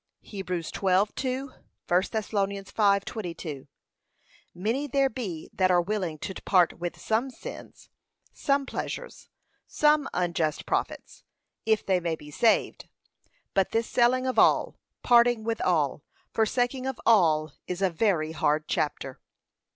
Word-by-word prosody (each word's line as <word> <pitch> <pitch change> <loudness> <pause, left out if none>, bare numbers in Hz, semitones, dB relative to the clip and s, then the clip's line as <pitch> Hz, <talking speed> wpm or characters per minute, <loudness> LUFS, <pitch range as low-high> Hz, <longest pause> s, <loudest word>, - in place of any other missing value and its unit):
(Heb 195 -2 -8
12:2; 195 - 0
1 275 - -14 0.5
Thess. 220 +2 -4
5:22) 200 - -1 0.9
Many 230 +11 -1
there 275 0 +2
be 190 -10 -5
that 185 -1 +2
are 180 -1 +4
willing 180 -3 -2
to 190 - -5
part 180 -4 +3
with 175 0 -5
some 225 +5 0
sins, 255 - -11 0.4
some 275 -1 0
pleasures, - - -6 0.4
some 300 -2 +2
unjust 170 -3 -1
profits, - - -3 0.4
if 220 -1 +2
they 190 -2 +2
may 170 -2 -2
be 150 -1 -13
saved; 225 +9 +1 0.6
but 195 -1 +2
this 225 0 0
selling 255 +1 +2
of 255 - +1
all, - - +4 0.3
parting 240 -2 +4
with 225 0 -2
all, 150 -6 +1 0.3
forsaking 245 +4 0
of 265 -3 -4
all, 155 -9 +4
is 180 +2 -3
a 190 - +2
very 165 -3 +1
hard 155 -1 0
chapter. 135 -3 -2
200 Hz, 130 wpm, -27 LUFS, 170-240 Hz, 0.9 s, are